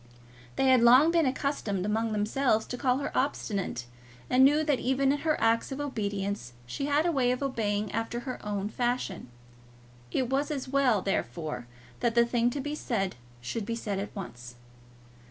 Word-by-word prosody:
They - - +1
had 255 -2 +6
long 255 +7 +7
been 335 -4 +3
accustomed 255 -8 -1
among 220 +2 0
themselves 220 +2 +1
to - - -5
call 250 0 +1
her 280 - -4
obstinate, 200 - -1 0.5
and 255 +1 +6
knew 295 +3 +5
that 295 -4 +1
even 265 +2 +2
in 290 - 0
her 310 0 0
acts 230 +3 +2
of 270 - -4
obedience 200 - -3
she 125 - -4
had 290 +2 +2
a 345 - +3
way 260 -5 +2
of 250 +2 0
obeying 210 -6 -1
after 225 +2 -2
her 255 0 -6
own 205 -1 -2
fashion. 240 - -2 0.8
It 255 - 0
was 275 +3 0
as 280 -4 -3
well, 255 -7 +2
therefore, 155 -6 -3 0.3
that 235 -1 0
the 235 0 +6
thing 235 0 +2
to 280 - -4
be 290 +2 -3
said 205 -10 -2 0.3
should 205 - -3
be 230 +3 -3
said 205 -4 -3
at 200 - -6
once. 125 -11 -8
240 Hz, 180 wpm, -29 LUFS, 205-275 Hz, 0.8 s, long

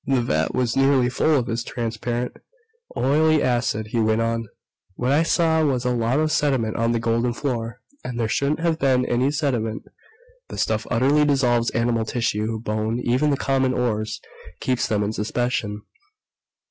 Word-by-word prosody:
"The 135 -2 +2
vat 120 - 0
was 125 -2 0
nearly 135 -2 +3
full 150 +5 +2
of 125 - 0
this 115 0 -2
transparent, 120 +1 -3 0.6
oily 155 +4 +3
acid," 120 -3 0
he 120 - 0
went 110 0 +2
on. 115 0 -1 0.5
"What 125 +5 -1
I 145 +3 +4
saw 165 -1 +2
was 130 -4 0
a 125 - +2
lot 120 +3 +1
of 155 0 +1
sediment 135 -8 +1
on 115 0 +1
the 115 - 0
golden 115 +1 0
floor. 120 -3 -4 0.2
And 120 -1 -5
there 115 - +1
shouldn't 140 +7 0
have 165 -1 0
been 130 -3 +2
any 125 +3 +1
sediment! 130 -7 -1 0.6
The - - -8
stuff 110 -1 -1
utterly 135 +5 +3
dissolves 125 -5 +2
animal 115 -1 0
tissue, 110 -2 -1
bone, 110 +1 -2
even 130 +5 +2
the 140 - +1
common 135 -2 +1
ores 110 -3 -1 0.4
keeps 130 -2 0
them 105 -1 0
in 105 +1 -2
suspension. 105 -1 -2
120 Hz, 170 wpm, -23 LUFS, 115-135 Hz, 0.6 s, I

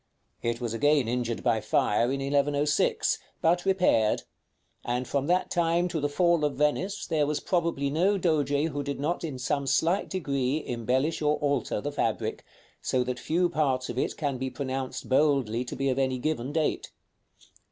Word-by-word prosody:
It 115 0 -1
was 120 -3 -3
again 145 +1 +3
injured 120 -1 -2
by 115 -3 +2
fire 105 +3 +2
in 135 +2 -1
1106, 145 +1 +1 0.2
but 175 +2 +2
repaired; 180 - +3 0.6
and 125 +1 -2
from 140 0 -1
that 180 +2 +1
time 170 0 +2
to 165 -2 -2
the 145 0 0
fall 170 +1 +2
of 145 -2 0
Venice 150 +8 0
there 150 -3 +1
was 150 0 -1
probably 170 -6 0
no 185 +7 +2
Doge 155 -3 +1
who 145 0 -3
did 140 0 -4
not 165 +6 -1
in 150 -6 -4
some 140 +2 -1
slight 165 +8 +1
degree 140 -5 -1
embellish 130 +7 -1
or 150 0 +2
alter 145 -1 -1
the - - -3
fabric, - - -2 0.4
so 130 -1 +1
that 125 0 -4
few 175 +7 +1
parts 140 -6 0
of 125 - -3
it - - -1
can 140 -4 -2
be 130 0 -2
pronounced 130 -1 -4
boldly 130 -4 +2
to - - -6
be 135 - -1
of 130 0 +1
any 130 -1 +1
given 135 -1 -2
date. 155 0 -1
145 Hz, 175 wpm, -27 LUFS, 130-160 Hz, 0.6 s, again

